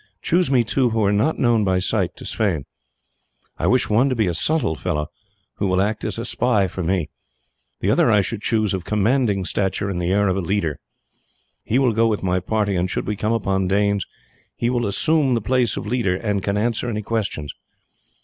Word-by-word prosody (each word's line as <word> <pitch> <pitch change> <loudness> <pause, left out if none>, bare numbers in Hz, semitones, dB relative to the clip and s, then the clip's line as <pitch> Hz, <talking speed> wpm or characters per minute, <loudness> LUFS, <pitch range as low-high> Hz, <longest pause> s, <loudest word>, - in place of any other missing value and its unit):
"Choose 175 -1 +2
me 130 -3 +3
two 125 +2 +1
who 110 -1 0
are 100 - +3
not 130 +11 +1
known 120 -4 +2
by 95 -2 +1
sight 90 - -1
to - - -11
Sweyn. 95 -10 -1 0.9
I - - 0
wish 130 0 +3
one 120 +6 +3
to 130 - 0
be 110 -2 +1
a 90 - 0
subtle 145 - +1
fellow, 75 0 -3 0.5
who 100 - 0
will 95 0 +1
act 105 +2 -1
as - - -2
a 115 - -4
spy 115 -4 +1
for 95 - -5
me; 85 -3 -1 0.7
the - - +1
other - - +3
I 105 -2 +5
should 105 +2 -4
choose 110 -4 0
of 95 -2 -3
commanding 105 -1 +1
stature; 100 +1 -1
and 90 -2 -3
the 85 - -1
air 100 +2 +2
of 95 0 0
a - - 0
leader. 85 -4 -1 0.8
He 120 - 0
will 130 -4 +3
go 115 +1 +3
with 105 -3 -1
my 90 0 +1
party, 105 0 -1
and 90 +1 0
should - - -3
we 105 - -2
come 110 +3 -1
upon 95 -4 0
Danes 100 0 +1 0.5
he 120 +1 -1
will 120 -3 0
assume 140 +5 +2
the - - +1
place 125 +2 0
of - - -4
leader, 105 -5 0
and 100 0 -1
can 100 +2 -1
answer 115 +2 -1
any 105 -2 -3
questions. 100 -10 -3
105 Hz, 215 wpm, -21 LUFS, 95-115 Hz, 0.9 s, I